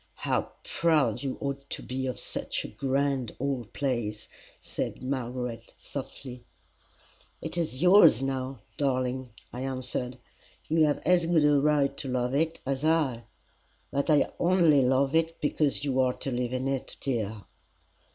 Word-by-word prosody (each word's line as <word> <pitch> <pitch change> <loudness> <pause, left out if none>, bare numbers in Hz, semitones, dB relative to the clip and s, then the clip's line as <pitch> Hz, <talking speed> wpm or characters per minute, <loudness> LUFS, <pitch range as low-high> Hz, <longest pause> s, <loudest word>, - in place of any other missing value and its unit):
"How - - -1
proud 145 -9 +2
you 135 -2 -3
ought 140 0 -4
to - - -4
be 130 +1 -3
of 125 -5 -3
such - - -3
a - - -6
grand 135 -3 -1
old 130 -4 -2
place!" 120 -6 -2 0.3
said - - -5
Margaret, 125 -3 -4
softly. 130 -2 -7 1.0
"It - - -5
is 165 -4 -2
yours 180 - +7
now, 130 -2 -3 0.2
darling," 130 -2 0 0.2
I 125 - -5
answered. 130 -1 -3 0.5
"You 160 0 +4
have 145 -1 0
as 175 -1 +4
good 165 -3 +4
a 145 -1 +5
right 140 -1 +2
to 135 - -3
love 125 0 -1
it 160 +3 +1
as 135 +1 -2
I 150 -7 +1 0.7
but 140 +3 -1
I 150 -2 +4
only 170 -5 +5
love 130 +2 +2
it 165 0 +1
because 145 -1 +1
you 135 -2 0
are 130 -1 +3
to 135 - -4
live 125 0 -1
in 130 +1 -1
it, 135 -1 -3
dear." 110 -6 -2
135 Hz, 150 wpm, -28 LUFS, 125-150 Hz, 1.0 s, yours